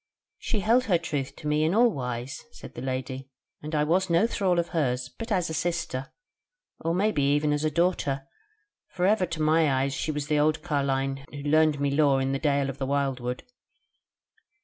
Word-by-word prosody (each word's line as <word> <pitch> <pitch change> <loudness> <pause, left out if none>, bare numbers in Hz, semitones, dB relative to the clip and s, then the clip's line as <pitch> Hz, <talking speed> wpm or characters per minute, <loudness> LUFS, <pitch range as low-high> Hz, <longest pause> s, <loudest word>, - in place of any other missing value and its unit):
"She 215 -5 -2
held 235 +5 +3
her 185 -5 +3
troth 145 -5 -4
to 150 - -7
me 150 +1 +2
in 160 +5 +1
all 235 +1 +5
wise," 125 - -5
said - - -11
the 120 - -7
Lady, 130 0 -4 0.3
"and 155 +1 -4
I 150 - +3
was 180 +5 +1
no 170 +5 +4
thrall 190 -6 +1
of 170 0 0
hers, 125 -7 -1
but 225 0 -8
as 180 -4 +1
a 160 - -4
sister, 160 -5 -2 0.7
or 165 - -1
it - - -1
may 210 +4 +2
be 140 -4 +2
even 150 0 +1
as 150 +1 -1
a 155 - +2
daughter; 150 -5 0 0.6
for 180 -1 -2
ever 195 -2 +3
to 165 -1 -4
my 155 -1 +3
eyes 135 +1 +1 0.2
was 150 -1 -3
she - - -10
the 150 -1 +2
old 155 +1 +1
carline 135 -3 -1
who 145 -1 -8
learned 155 0 +3
me 140 0 +1
lore 140 -2 +3
in 135 0 0
the 135 - -1
Dale 140 -2 +1
of 135 - -14
the 135 - -2
wildwood. 135 -3 -1
150 Hz, 210 wpm, -27 LUFS, 135-170 Hz, 0.7 s, all